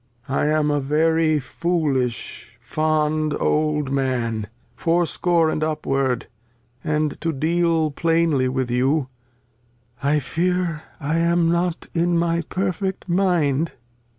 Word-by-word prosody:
I 140 +2 +1
am 150 -1 +2
a 145 - +1
very 155 +2 +2
foolish 130 -6 -2
fond 155 +2 0
old 150 -2 +1
Man, 120 -6 -1 0.3
Fourscore 170 -1 +1
and 155 - -1
upward; 135 -5 0 0.6
and 150 -1 -1
to 165 - 0
deal 160 +1 +1
plainly 165 -4 +2
with 130 -1 -2
you, 130 +3 +1 0.9
I 145 +2 +2
fear 170 +3 -1 0.2
I 155 +2 0
am 170 0 +2
not 170 0 0
in 170 0 +2
my 170 0 +1
perfect 190 0 -2
Mind. 170 -5 +2
Cord. - - -32
155 Hz, 115 wpm, -22 LUFS, 140-170 Hz, 0.9 s, am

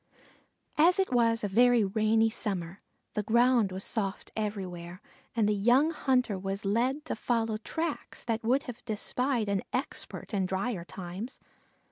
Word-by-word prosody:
As 345 +4 +6
it 380 -8 +1
was 230 -2 +3
a - - +1
very 240 +3 +5
rainy 220 +2 +2
summer, 190 -5 -4 0.3
the 210 - 0
ground 235 -1 +3
was 190 +1 -3
soft 200 -4 -2
everywhere, 185 -5 -4 0.4
and 220 -3 +3
the 210 - +3
young 245 +10 +4
hunter 250 - +1
was 195 +1 -4
led 250 +9 +1
to - - -2
follow 225 -1 0
tracks 320 +7 -4
that 230 -1 -2
would 255 +5 +2
have 245 -2 -8
defied 245 +1 0
an 200 -1 +1
expert 255 -3 -4
in 190 -2 +1
dryer 190 0 -2
times. 185 +7 -7
220 Hz, 150 wpm, -29 LUFS, 195-245 Hz, 0.4 s, As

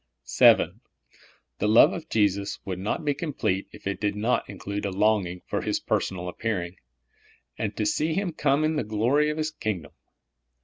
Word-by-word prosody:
VII. - - +6 0.9
The 105 - +1
love 115 - +6
of 165 -2 -7
Jesus 100 -2 +1
would 95 -2 -4
not 105 +9 -2
be 145 - +2
complete 140 - -2
if - - -14
it 100 0 -3
did 105 -1 0
not 110 +4 0
include 100 +1 -5
a 100 - -1
longing 95 -3 +1
for - - -2
His - - -1
personal 90 -1 -2
appearing, 90 -2 -3 0.8
and 105 -1 -4
to 105 - 0
see 155 +6 0
Him 190 -3 -1
come 145 -1 +1
in 155 0 +1
the - - 0
glory 120 +8 +2
of 150 - -3
His 155 0 -1
kingdom. 95 - -4
105 Hz, 175 wpm, -26 LUFS, 100-150 Hz, 0.9 s, VII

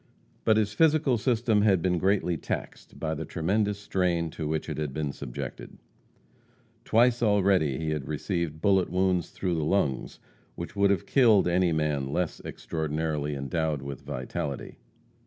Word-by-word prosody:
But 110 -1 +4
his 105 -1 +1
physical 150 -3 +3
system 115 -3 +2
had 100 -3 +4
been 90 0 +1
greatly 95 -1 +1
taxed - - -6
by 80 -1 -1
the 80 +1 -4
tremendous 100 +6 0
strain 90 -5 0
to 80 -1 -4
which 80 0 -2
it - - -4
had 75 -3 -3
been 75 -2 -1
subjected. 65 -3 -7 1.1
Twice 120 +2 +3
already 100 - +3 0.2
had 75 -1 -1
he 65 - -12
received 80 0 -3
bullet 95 -3 +3
wounds 90 -1 +1
through 90 -2 -2
the 80 -2 -1
lungs 75 -6 0 0.4
which - - -7
would 100 0 +3
have 100 -4 +1
killed 115 -9 +4
any 90 0 +2
man 75 -4 -1
less 90 +1 -1
extraordinarily 75 -2 -3
endowed 75 +1 -2
with 70 -1 -6
vitality. 70 +1 -5
85 Hz, 155 wpm, -27 LUFS, 75-100 Hz, 1.1 s, But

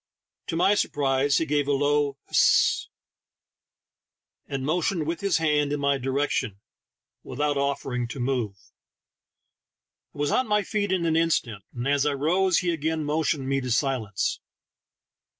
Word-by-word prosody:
To 165 - -3
my 185 +4 +4
sur 205 - +1
prise 140 0 +1
he 165 - +1
gave 145 -2 0
a 145 - +2
low 145 0 +1
"Hist!" - - +3 1.6
and 135 -1 -4
motioned 170 +1 0
with 165 +2 -3
his 200 -3 +2
hand 150 -2 +1
in 145 - -1
my 140 -1 +1
direction, 130 -5 -1 0.6
without 145 +3 -2
offering 140 -3 -2
to 130 - -7
move. 120 -5 -1 1.6
I - - -13
was 145 0 0
on 255 - +1
my 210 -1 +2
feet 205 0 -2
in 180 -3 0
an 160 -1 +1
instant, 125 - 0
and 120 +2 -3
as 140 +1 +2
I 145 - +1
rose 175 +6 +2
he 175 - +2
again 160 0 -2
motioned 150 -2 -1
me 135 0 0
to 125 - -4
silence. 120 -6 -1
145 Hz, 150 wpm, -25 LUFS, 135-160 Hz, 1.6 s, my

